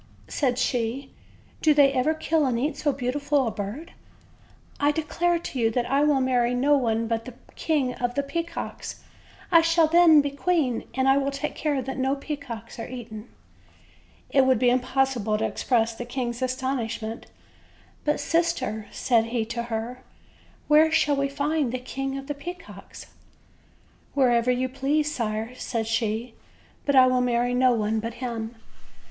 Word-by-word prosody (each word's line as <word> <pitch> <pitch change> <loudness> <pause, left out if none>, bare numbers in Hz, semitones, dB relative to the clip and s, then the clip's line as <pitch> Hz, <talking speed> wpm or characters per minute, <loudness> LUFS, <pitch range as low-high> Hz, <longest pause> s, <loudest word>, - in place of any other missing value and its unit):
said 255 -4 0
she, 250 +2 -1 0.5
"do 305 -2 +4
they 280 -2 +5
ever 280 +5 +1
kill 315 0 +1
and 240 -2 0
eat 290 +5 -1
so 295 - 0
beau 255 -2 -2
tiful 285 0 +1
a 225 - -1
bird? 215 +13 -6 0.9
I 290 0 +3
declare 330 +3 0
to 305 -6 -6
you 225 -1 +3
that 240 +1 -1
I 275 +3 +1
will 295 -2 +3
marry 250 -2 +1
no 280 +4 +3
one 230 -4 +1
but 225 0 -2
the 255 - -9 0.2
King 285 -6 0
of 245 0 -3
the 280 - 0
Peacocks; 335 +4 -5 0.5
I 335 -1 +7
shall 330 0 +4
then 325 -1 +6
be 285 -1 0
queen, 280 -4 0
and 265 0 +1
I 270 +1 +5
will 275 0 +1
take 280 +2 -4
care 290 -4 -1
that 265 +1 -5
no 265 +1 +1
peacocks 275 -7 -7
are 230 - -6
eaten." 230 -3 -8 1.0
It 270 -2 +4
would 260 -2 +4
be 245 +1 +3
impossible 255 -4 +1
to 220 - -1
express 230 -2 0
the 230 - -6
king's 240 0 -4
astonish 255 -2 -2
ment. 220 +1 -6 0.8
"But, 295 0 +2
sister/' 285 -8 -1
said 230 -3 +2
he 230 -1 -2
to 235 - -2
her, 230 +3 -4 0.7
"where 310 +1 +5
shall 295 -2 +3
we 275 0 0
find 285 -1 -1
the 255 - -2
King 270 +2 -4
of 270 - -7
the 290 - -3
Peacocks?" 345 +6 -10 1.1
"Wherever 245 -3 +3
you 250 +1 +1
please, 295 +4 0
sire," 220 0 -3
said 230 -2 -3
she; 225 +1 -1 0.5
"but 280 - +3
I 260 -1 +8
will 255 0 +2
marry 245 0 +1
no 250 0 +4
one 220 -1 0
but 230 +1 -5
him." 235 -2 -5
260 Hz, 170 wpm, -25 LUFS, 235-285 Hz, 1.1 s, I